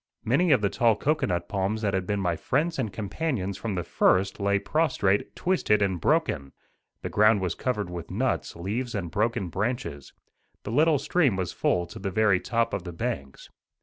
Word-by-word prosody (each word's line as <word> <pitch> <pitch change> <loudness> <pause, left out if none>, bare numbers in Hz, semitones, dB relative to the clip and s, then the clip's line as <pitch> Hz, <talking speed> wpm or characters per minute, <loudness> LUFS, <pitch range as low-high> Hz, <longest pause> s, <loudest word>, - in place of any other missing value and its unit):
Many 155 +9 +3
of 135 - +5
the 100 - +2
tall 115 -2 +3
cocoanut 90 - 0
palms 100 +4 -1
that 100 -2 +1
had 95 -1 -1
been 100 -1 0
my 90 -3 0
friends 150 - -1
and 110 -6 -1
companions 100 - -3
from 105 -1 -4
the 90 - -2
first 95 +5 +2
lay 100 0 +2
prostrate, 105 -7 0
twisted 140 - +2
and 95 -4 -1
broken. 70 -2 0 0.5
The - - -3
ground 105 0 +4
was 90 -3 -1
covered 105 -4 -2
with 85 -1 -6
nuts, - - -1
leaves 110 +8 -3
and 90 -5 -3
broken 105 -4 0
branches. 95 - -3 0.5
The - - -5
little 150 +4 +4
stream 140 - +2
was 95 -3 -2
full 90 0 +1
to 85 - -10
the 95 - -3
very 105 -2 +3
top 115 +2 0
of 100 - -1
the 90 - -6
banks. 80 - -5
100 Hz, 185 wpm, -26 LUFS, 95-120 Hz, 0.5 s, of